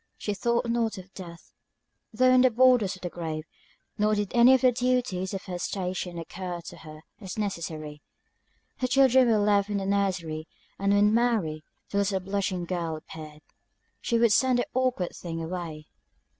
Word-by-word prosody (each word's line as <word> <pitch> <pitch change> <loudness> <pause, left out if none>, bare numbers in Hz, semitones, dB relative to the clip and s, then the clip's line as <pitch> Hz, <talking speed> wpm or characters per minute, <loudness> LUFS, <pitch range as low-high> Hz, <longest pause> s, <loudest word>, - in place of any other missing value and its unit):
She 210 - -3
thought 235 +4 0
not 230 -3 0
of 185 +1 -11
death, 170 -3 -11 0.6
though 255 +3 +4
on 255 - +6
the 255 - +6
borders 245 -5 +4
of 185 - -16
the 175 - -2
grave; 160 -2 -4 0.6
nor 210 +1 +3
did 205 -2 -2
any 245 +2 +7
of 260 - 0
the 255 -1 +5
duties 245 -7 -1
of 195 - -5
her 180 -1 -6
station 180 -1 -3
occur 175 +1 -6
to 170 - -10
her 155 -1 -12 0.2
as 190 -2 -7
necessary. 160 -7 -4 0.8
Her 255 - -1
children 260 -1 +5
were 220 - +4
left 205 -1 +2
in 205 - -1
the 195 - -3
nursery; 180 -6 -1 0.3
and 200 0 +1
when 205 +1 +4
Mary, 220 -10 +1 0.3
the 200 - +1
little 200 -1 +1
blushing 190 -2 -2
girl, 170 -2 -3
appeared, 155 -1 -11 0.6
she 235 - 0
would 230 -1 +4
send 255 +1 +3
the 245 - 0
awkward 255 -8 0
thing 165 -2 -6
away. 165 -2 -5
195 Hz, 175 wpm, -27 LUFS, 175-235 Hz, 0.8 s, any